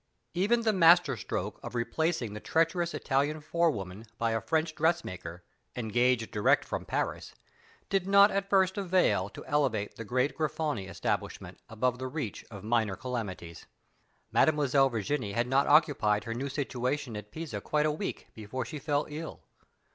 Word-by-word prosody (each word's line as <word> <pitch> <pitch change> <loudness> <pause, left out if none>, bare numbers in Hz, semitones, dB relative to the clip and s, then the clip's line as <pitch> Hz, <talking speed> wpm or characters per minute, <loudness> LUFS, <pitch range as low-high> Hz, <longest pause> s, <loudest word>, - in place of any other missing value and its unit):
Even 205 +7 +2
the 220 -1 +2
master 170 -5 +6
stroke 100 - -4
of - - -7
replacing 120 0 -1
the 105 - -6
treacherous 165 +5 0
Italian 145 +3 0
forewoman 120 - -1
by 115 0 0
a 115 0 0
French 160 0 0
dressmaker, 120 - -2 0.3
engaged 120 0 +1
direct 105 -1 +3
from - - -4
Paris, - - -3 0.5
did 195 -1 0
not 200 +1 +7
at 195 0 -1
first 190 0 +3
avail 175 - +2
to - - -11
elevate 130 -9 0
the 115 - -5
great 125 +5 0
Grifoni 155 -9 -2
establishment 90 - -3
above 125 +3 -1
the 130 - -3
reach 130 -6 -5
of 100 -3 -10
minor 110 -3 +1
calamities. 100 -10 -6 0.6
Mademoiselle 140 -3 +3
Virginie 110 -1 -2
had 120 +3 +1
not 135 +2 +2
occupied 140 -9 +4
her 115 0 -4
new 135 +4 -3
situation 130 -2 -2
at 105 0 -7
Pisa 160 +4 -6
quite 150 0 +1
a 155 - +2
week 160 +7 -5
before 115 +4 -5
she 145 +6 -6
fell 145 -1 0
ill. 155 +2 -7
135 Hz, 155 wpm, -30 LUFS, 110-160 Hz, 0.6 s, not